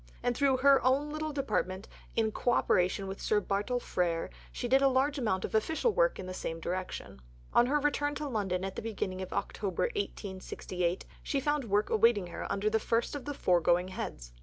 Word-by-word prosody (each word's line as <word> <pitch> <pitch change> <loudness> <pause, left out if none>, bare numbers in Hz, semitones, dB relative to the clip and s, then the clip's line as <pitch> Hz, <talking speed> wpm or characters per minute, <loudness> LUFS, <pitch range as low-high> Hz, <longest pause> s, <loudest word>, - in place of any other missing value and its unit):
And 245 - +1
through 275 -1 +3
her 270 0 +5
"own 275 +4 +2
little 310 0 -3
Department" 215 -9 -1 0.3
in 220 -1 +2
co 245 +3 +1
operation 185 0 +2
with 195 0 -6
Sir 210 - +2
Bartle 205 +5 -1
Frere 170 -7 -1 0.2
she 245 - -3
did 265 +2 +4
a 275 - +6
large 275 +2 +2
amount 190 -6 0
of - - -7
official 320 - +2
work - - +3
in - - -6
the 185 - -5
same 165 -2 -4
direction. 180 - -5 0.3
On 240 - +5
her 295 +3 +2
return 290 0 0
to 300 0 -3
London 195 -7 -1
at 195 - -5
the - - -4
beginning 195 -4 -3
of 185 - -6
October 200 -3 -2
1868, 185 - -3 0.2
she 280 - -1
found 295 0 0
work 205 0 +1
awaiting 220 -3 +4
her 175 - -6
under 200 +2 0
the 220 +1 +3
first 230 +2 0
of 290 -3 -5
the 290 -1 -4
foregoing 180 - +3
heads. - - -6
220 Hz, 200 wpm, -31 LUFS, 185-275 Hz, 0.3 s, a